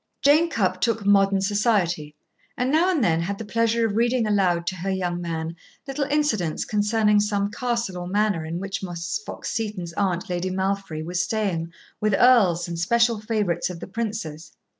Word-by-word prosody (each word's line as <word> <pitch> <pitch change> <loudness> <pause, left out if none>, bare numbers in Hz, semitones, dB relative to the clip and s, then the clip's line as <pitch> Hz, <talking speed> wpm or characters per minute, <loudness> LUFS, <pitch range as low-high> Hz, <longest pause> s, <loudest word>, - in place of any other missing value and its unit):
Jane 310 +4 +5
Cupp 185 - 0
took 225 -3 0
"Modern 195 -1 +4
Society," 195 -7 0 0.4
and 250 +2 0
now 330 +5 +3
and 325 -9 +1
then 165 -5 +2
had 195 +4 -3
the 225 - -6
pleasure 230 +1 +1
of 210 -2 -1
reading 240 +1 +2
aloud 185 -5 +1
to 185 - -2
her 185 +3 -3
young 180 -2 -1
man 165 -1 -4 0.3
little 275 +1 -2
incidents 270 - 0
concerning 210 0 +2
some 205 -1 0
castle 235 -6 -2
or 175 - -5
manor 205 -3 +1
in 160 +2 -4
which 195 +1 -4
Miss 175 - -3
Fox - - -6
Seton's 210 -7 -3
aunt, 185 0 -1
Lady 180 0 -2
Malfry, 190 -4 -2
was 175 +1 -1
staying 180 -6 -2 0.3
with 210 -2 +2
earls 195 -9 +4
and 170 -1 -5
special 230 +5 +2
favorites 210 -6 -1
of 180 -2 -7
the - - -6
Prince's. 195 -7 -5
200 Hz, 180 wpm, -24 LUFS, 175-225 Hz, 0.4 s, Jane